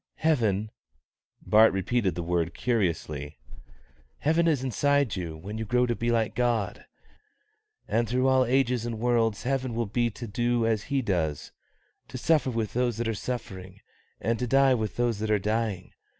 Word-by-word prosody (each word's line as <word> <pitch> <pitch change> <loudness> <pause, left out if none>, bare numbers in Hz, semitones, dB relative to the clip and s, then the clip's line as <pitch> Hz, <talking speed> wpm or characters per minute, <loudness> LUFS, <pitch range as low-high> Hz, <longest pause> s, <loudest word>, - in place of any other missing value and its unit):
"Heaven" 110 -9 +1 0.7
(Bart 110 +1 +6
repeated 95 -1 0
the 85 - -3
word 85 0 -1
curiously), 80 - -2 0.8
"heaven 160 +3 +2
is 145 -6 +1
inside 140 0 +1
you 85 -4 -5
when 100 +7 -7
you 110 - -3
grow 125 +3 +2
to 120 -1 -1
be 120 +1 -2
like 115 -2 +1
God; 120 -4 -1 1.0
and 115 -1 0
through 130 +2 +2
all 130 -1 +4
ages 125 -1 +1
and 115 -1 -4
worlds 115 -3 +1
heaven 130 -2 -1
will 115 0 0
be 120 +3 0
to 120 +2 -8
do 120 +2 0
as 110 -2 0
He 140 -2 0
does, 80 -8 -2 0.6
to 130 - -7
suffer 150 +1 +2
with 115 -3 -2
those 120 -2 0
that 120 0 -2
are 115 - 0
suffering, 95 -5 -6 0.4
and 115 0 -1
to 125 - -1
die 135 +1 +4
with 110 -3 -2
those 120 -3 0
that 110 0 -2
are 105 - +4
dying. 105 -2 -2
115 Hz, 170 wpm, -27 LUFS, 100-125 Hz, 1.0 s, Bart